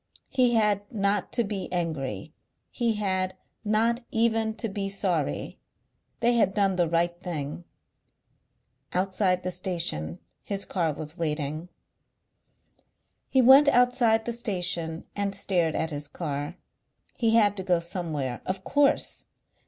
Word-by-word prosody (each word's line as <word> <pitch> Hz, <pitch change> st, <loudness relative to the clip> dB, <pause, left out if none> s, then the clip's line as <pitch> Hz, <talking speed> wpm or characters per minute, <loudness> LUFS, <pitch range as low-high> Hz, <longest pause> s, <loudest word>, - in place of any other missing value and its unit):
He 250 Hz, -3 st, +3 dB
had 210 Hz, -2 st, +3 dB
not 200 Hz, -2 st, 0 dB
to 240 Hz, -, +2 dB
be 200 Hz, -4 st, -4 dB
angry, 155 Hz, -3 st, -3 dB, 0.4 s
he 230 Hz, -2 st, 0 dB
had 185 Hz, -2 st, 0 dB, 0.3 s
not 225 Hz, +3 st, +2 dB
even 225 Hz, -1 st, +1 dB
to 225 Hz, +1 st, -3 dB
be 195 Hz, -1 st, -3 dB
sorry. 185 Hz, -7 st, -1 dB, 0.6 s
They 240 Hz, +1 st, +4 dB
had 195 Hz, -5 st, +2 dB
done 195 Hz, -2 st, +2 dB
the 175 Hz, -2 st, +1 dB
right 170 Hz, +1 st, +1 dB
thing. 160 Hz, -1 st, -5 dB, 1.3 s
Outside 185 Hz, 0 st, +1 dB
the 185 Hz, -, -2 dB
station 165 Hz, -, -3 dB, 0.2 s
his 200 Hz, -1 st, -3 dB
car 170 Hz, -4 st, 0 dB
was 155 Hz, +3 st, -6 dB
waiting. 155 Hz, +1 st, -2 dB, 1.6 s
He 260 Hz, -1 st, +4 dB
went 270 Hz, +4 st, +8 dB
outside 245 Hz, -3 st, +4 dB
the 235 Hz, -, -2 dB
station 180 Hz, -7 st, -3 dB
and 200 Hz, -1 st, -1 dB
stared 175 Hz, -5 st, +1 dB
at 160 Hz, -, -1 dB
his 145 Hz, 0 st, -4 dB
car. 145 Hz, 0 st, -4 dB, 0.6 s
He 225 Hz, -1 st, +3 dB
had 205 Hz, -3 st, +4 dB
to 190 Hz, -, -2 dB
go 180 Hz, -2 st, +2 dB
somewhere. 160 Hz, -7 st, -3 dB
Of 185 Hz, 0 st, -3 dB
course! 285 Hz, +4 st, +2 dB
190 Hz, 130 wpm, -27 LUFS, 165-220 Hz, 1.6 s, went